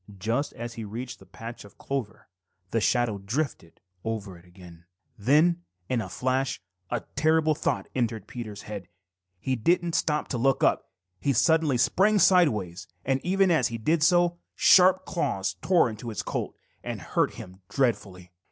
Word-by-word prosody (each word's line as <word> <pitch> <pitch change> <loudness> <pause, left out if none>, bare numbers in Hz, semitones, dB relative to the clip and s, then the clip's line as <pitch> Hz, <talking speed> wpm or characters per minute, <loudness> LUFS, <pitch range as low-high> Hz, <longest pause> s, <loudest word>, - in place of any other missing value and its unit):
Just 115 +9 -1
as 120 0 -6
he 115 - -6
reached 120 +5 -6
the - - -17
patch 115 +1 -9
of 100 -1 -16
clover, 135 -6 -5 0.4
the 115 - +1
shadow 120 -3 +1
drifted 110 - -4 0.2
over 105 -4 -4
it 85 +1 -17
again. 90 -2 -15 0.3
Then 155 - +3
all 90 - -46
in 120 - +1
a 95 - -6
flash 130 +6 -1 0.3
a 120 -2 -1
terrible 155 0 +3
thought - - -2
entered 115 -5 -1
Peter's 110 -3 -7
head. 100 -4 -7 0.5
He 130 +7 -1
didn't 170 +8 +1
stop 150 -1 0
to 125 - -2
look 135 +2 +2
up. - - +2 0.3
He 140 - +1
suddenly 160 +1 +3
sprang 205 - +3
sideways, 110 - +3 0.2
and 135 0 +1
even 190 +1 +3
as 150 -8 +3
he 115 - -5
did 155 +9 +1
so, 175 +1 +3 0.2
sharp 185 0 +6
claws 120 - -2
tore 180 -7 +4
his 110 -3 -5
coat - - -4 0.3
and - - -4
hurt - - 0
him 95 +1 -11
dreadfully. 100 -8 -1
120 Hz, 160 wpm, -27 LUFS, 105-155 Hz, 0.5 s, sharp